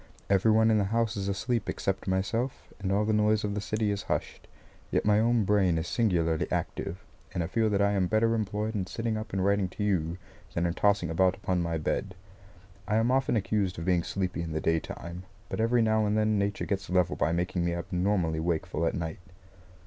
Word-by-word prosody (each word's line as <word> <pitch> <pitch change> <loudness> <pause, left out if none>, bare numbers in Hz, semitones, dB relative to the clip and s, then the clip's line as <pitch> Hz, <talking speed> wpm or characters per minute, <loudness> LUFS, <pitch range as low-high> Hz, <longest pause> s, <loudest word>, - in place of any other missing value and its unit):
Every 100 +3 +4
one 110 +1 +5
in 110 - +4
the 100 - +1
house 115 +1 0
is 100 -1 -3
asleep 110 +4 -1
except 95 0 -2
myself; 100 +7 -2
and 95 -1 -2
all 105 +2 +2
the 110 - +1
noise 105 0 +3
of 105 -1 -1
the 105 - -2
city 110 0 -1
is 100 0 -2
hushed. - - -4 0.4
Yet - - 0
my 105 0 +4
own 115 0 +3
brain 95 -4 +3
is 80 +1 -2
singularly 85 -9 +1
active, 95 +5 -3 0.3
and 90 - 0
I - - -2
feel 110 +5 +1
that 100 -1 +2
I 100 - +3
am 95 -3 +1
better 110 +3 +2
employed 105 0 -1
in 95 -4 -2
sitting 115 +3 -2
up 110 -2 -5
and 95 -1 0
writing 100 -2 +2
to 105 - -5
you, 90 -4 0 0.4
than 85 - +1
in 85 - 0
tossing 100 -3 +2
about 95 +3 +3
upon 95 -3 -1
my 85 -1 -1
bed. 95 +4 -2 0.7
I 105 - +1
am 115 +3 +3
often 135 -1 +2
accused 100 -3 0
of 80 - -5
being 90 -2 +3
sleepy 90 0 -2
in 80 -1 -4
the 80 - 0
daytime, 85 +2 -2 0.3
but - - -4
every 115 +1 +3
now 110 -1 +2
and 105 +1 +1
then 110 -1 +2
Nature 100 0 -1
gets 100 0 -3
level 90 -2 +2
by - - +1
making 90 +1 -1
me 85 0 0
abnormally 90 -2 0
wakeful 85 0 -1
at - - -1
night. 80 -1 -4
100 Hz, 215 wpm, -28 LUFS, 90-110 Hz, 0.7 s, one